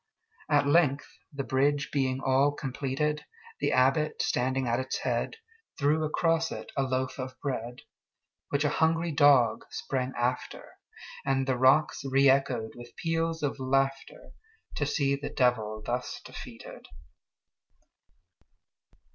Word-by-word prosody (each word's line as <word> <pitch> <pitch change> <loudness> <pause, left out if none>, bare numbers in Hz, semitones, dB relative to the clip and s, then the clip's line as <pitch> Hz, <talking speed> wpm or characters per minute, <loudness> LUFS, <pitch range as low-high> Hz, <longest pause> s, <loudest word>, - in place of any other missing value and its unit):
At 145 -2 +4
length, 140 -2 +3 0.2
the 140 -1 -4
bridge 140 +2 +1
being 135 -2 0
all 135 +2 +3
completed, 140 +2 -2 0.4
The - - 0
Abbot, 135 +4 +2
standing 130 +1 0
at 120 +1 +1
its 130 - -2
head, - - -2 0.4
Threw 150 +2 +2
across 165 +1 +1
it - - -7
a - - +1
loaf 130 0 -2
of 130 0 -6
bread, 125 -3 -4 0.7
Which 140 +1 +1
a - - +3
hungry 165 +2 +1
dog 140 -7 +4
sprang 130 -1 -3
after, 125 +1 -2 0.5
And 135 -1 +1
the 130 -1 +1
rocks 130 +5 +3
reëchoed 135 -4 +2
with 120 0 -12
peals 165 -1 -1
of 145 -1 -1
laughterTo 135 - -3
see 140 -4 +1
the 140 - -5
Devil 110 -4 0
thus 125 +1 -3
defeated! - - -10
135 Hz, 120 wpm, -28 LUFS, 130-145 Hz, 0.7 s, At